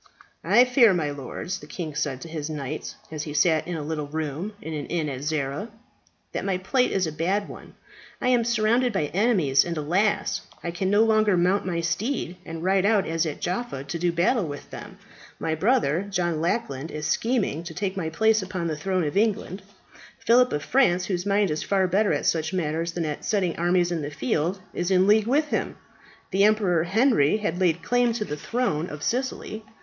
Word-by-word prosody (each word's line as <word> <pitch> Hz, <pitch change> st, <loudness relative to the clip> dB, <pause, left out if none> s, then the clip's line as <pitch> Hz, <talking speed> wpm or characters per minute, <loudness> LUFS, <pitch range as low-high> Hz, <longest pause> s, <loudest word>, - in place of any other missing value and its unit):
"I 245 Hz, -, +5 dB
fear, 245 Hz, -5 st, +5 dB
my 150 Hz, -4 st, -1 dB
lords," 145 Hz, +7 st, -5 dB
the 150 Hz, -, -12 dB
king 155 Hz, -1 st, -5 dB
said 145 Hz, -3 st, -2 dB
to -, -, -7 dB
his 155 Hz, -2 st, -5 dB
knights 150 Hz, -1 st, -5 dB, 0.2 s
as 155 Hz, -2 st, -4 dB
he 150 Hz, -1 st, -6 dB
sat 155 Hz, +1 st, +3 dB
in 175 Hz, -, -3 dB
a 155 Hz, -, -4 dB
little 150 Hz, -1 st, -3 dB
room 160 Hz, +6 st, -4 dB
in 160 Hz, -, -6 dB
an 150 Hz, -2 st, -4 dB
inn 165 Hz, -3 st, -1 dB
at 130 Hz, -2 st, -5 dB
Zara, 150 Hz, +6 st, -2 dB, 0.6 s
"that -, -, -3 dB
my 195 Hz, -2 st, 0 dB
plight 250 Hz, +7 st, +1 dB
is 190 Hz, -2 st, +1 dB
a 160 Hz, -, -3 dB
bad 190 Hz, +6 st, -1 dB
one. -, -, -11 dB, 0.4 s
I 250 Hz, -, 0 dB
am 245 Hz, -2 st, +3 dB
surrounded 235 Hz, +1 st, +2 dB
by 150 Hz, -7 st, -1 dB
enemies, 180 Hz, -, +3 dB
and, 170 Hz, -1 st, -4 dB
alas! 180 Hz, +8 st, 0 dB, 0.2 s
I 170 Hz, -, -2 dB
can 185 Hz, +2 st, -2 dB
no 205 Hz, +2 st, +5 dB
longer 215 Hz, -3 st, +3 dB
mount 185 Hz, +2 st, +2 dB
my 170 Hz, -2 st, -1 dB
steed 180 Hz, -, -2 dB
and 165 Hz, 0 st, -6 dB
ride 190 Hz, +1 st, +2 dB
out 205 Hz, -2 st, +3 dB
as 165 Hz, 0 st, 0 dB
at 150 Hz, -, -6 dB
Jaffa 180 Hz, -, -3 dB
to 140 Hz, +5 st, -5 dB
do 175 Hz, +1 st, +1 dB
battle 175 Hz, +4 st, +1 dB
with 145 Hz, -1 st, -8 dB
them. -, -, -9 dB, 0.4 s
My 160 Hz, -, -2 dB
brother, 190 Hz, -, +1 dB
John 175 Hz, -5 st, -1 dB
Lackland, 165 Hz, -, -2 dB
is 150 Hz, -1 st, -5 dB
scheming 215 Hz, -, 0 dB
to 165 Hz, -, -7 dB
take 190 Hz, 0 st, -2 dB
my 170 Hz, -5 st, -2 dB
place 220 Hz, +6 st, +3 dB
upon 185 Hz, -2 st, -4 dB
the 160 Hz, -2 st, -1 dB
throne 185 Hz, +3 st, -1 dB
of 145 Hz, -2 st, -3 dB
England. 205 Hz, -2 st, 0 dB, 0.6 s
Philip 250 Hz, +2 st, +4 dB
of 150 Hz, -, -2 dB
France, 185 Hz, -10 st, +3 dB
whose 180 Hz, 0 st, -2 dB
mind 200 Hz, -3 st, +2 dB
is 150 Hz, -, -2 dB
far 195 Hz, -1 st, +1 dB
better 200 Hz, +3 st, +2 dB
at -, -, -1 dB
such 160 Hz, +2 st, 0 dB
matters 165 Hz, -1 st, -1 dB
than 170 Hz, -1 st, -2 dB
at 150 Hz, -1 st, -4 dB
setting 190 Hz, -5 st, 0 dB
armies 175 Hz, +1 st, +2 dB
in 170 Hz, -2 st, -1 dB
the 145 Hz, -, -4 dB
field, 150 Hz, +7 st, -1 dB
is 175 Hz, +1 st, -2 dB
in 185 Hz, -1 st, +4 dB
league 210 Hz, +1 st, +4 dB
with 295 Hz, +4 st, +2 dB
him. -, -, -2 dB, 0.6 s
The 195 Hz, +1 st, +3 dB
Emperor 195 Hz, -6 st, +2 dB
Henry 215 Hz, -, +3 dB
has 190 Hz, -5 st, -2 dB
laid 175 Hz, -2 st, +1 dB
claim 245 Hz, -1 st, +2 dB
to 220 Hz, -2 st, -2 dB
the 150 Hz, -, -4 dB
throne 175 Hz, -3 st, -1 dB
of 150 Hz, 0 st, -8 dB
Sicily. 245 Hz, -3 st, -2 dB
175 Hz, 205 wpm, -25 LUFS, 155-210 Hz, 0.6 s, I